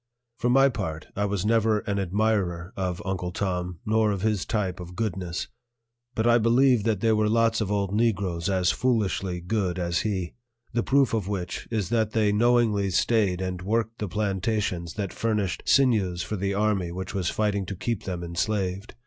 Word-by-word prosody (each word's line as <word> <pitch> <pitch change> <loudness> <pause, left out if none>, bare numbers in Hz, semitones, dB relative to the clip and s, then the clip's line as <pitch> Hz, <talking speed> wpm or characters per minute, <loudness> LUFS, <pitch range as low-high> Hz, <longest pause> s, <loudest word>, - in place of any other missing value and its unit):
For 120 - +1
my 135 +2 +6
part, 80 - -4
I 100 - 0
was 100 -1 -1
never 110 -1 +3
an 100 -1 -2
admirer 95 -2 0
of 90 -2 -3
Uncle 90 -2 -2
Tom, 90 -2 -3
nor 110 0 +2
of 100 -2 -2
his 105 -3 0
type 95 -5 -1
of 90 0 -8
goodness; 95 -5 -3 0.7
but 110 - 0
I 120 0 +5
believe 120 0 +4
that 110 -4 +1
there 115 -1 +3
were 105 0 +2
lots 115 0 +2
of 105 -1 -1
old 100 -1 0
Negroes 100 -6 0
as 95 -2 +2
foolishly 95 - 0
good 95 -1 -1
as 85 -1 0
he; 95 -5 -2 0.4
the 120 - +1
proof 135 0 +2
of 105 -4 0
which 95 -3 -4
is 105 -6 -1
that 110 -2 +1
they 110 -2 +3
knowingly 110 -2 +3
stayed 95 -1 +2
and 90 -1 -3
worked 115 +3 -1
the 105 - -2
plantations 95 -3 -1
that 100 -3 -3
furnished 105 -5 -1
sinews 105 -10 +3
for 100 +4 -4
the 100 0 -1
army 100 -4 +1
which 95 +1 -5
was 95 -3 0
fighting 100 -3 -1
to 100 - -4
keep 115 +3 -3
them 90 -2 -4
enslaved. 95 +3 -2
100 Hz, 185 wpm, -26 LUFS, 90-110 Hz, 0.7 s, my